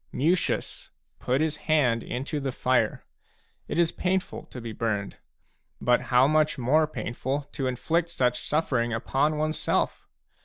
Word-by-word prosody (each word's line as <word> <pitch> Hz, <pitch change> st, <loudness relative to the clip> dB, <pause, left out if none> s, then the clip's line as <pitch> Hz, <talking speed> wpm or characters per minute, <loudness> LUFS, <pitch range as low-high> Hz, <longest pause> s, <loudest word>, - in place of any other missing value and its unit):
Mucius 170 Hz, +6 st, 0 dB, 0.3 s
put 130 Hz, +3 st, 0 dB
his 155 Hz, -1 st, 0 dB
hand 125 Hz, -7 st, +3 dB
into 135 Hz, +7 st, -3 dB
the 135 Hz, -1 st, -2 dB
fire. 130 Hz, 0 st, 0 dB, 0.6 s
It -, -, -3 dB
is 170 Hz, -1 st, +3 dB
painful 185 Hz, 0 st, -2 dB
to 125 Hz, -, -9 dB
be 115 Hz, -1 st, -6 dB
burned; 105 Hz, -3 st, -2 dB, 0.6 s
but 120 Hz, 0 st, +3 dB
how 125 Hz, +1 st, +6 dB
much 155 Hz, +1 st, +2 dB
more 150 Hz, +5 st, +3 dB
painful 135 Hz, 0 st, -3 dB
to 135 Hz, -, -2 dB
inflict 165 Hz, +7 st, 0 dB
such 125 Hz, -5 st, 0 dB
suffering 125 Hz, -6 st, +1 dB
upon 140 Hz, +6 st, +1 dB
oneself 155 Hz, 0 st, -1 dB
135 Hz, 140 wpm, -27 LUFS, 125-155 Hz, 0.6 s, how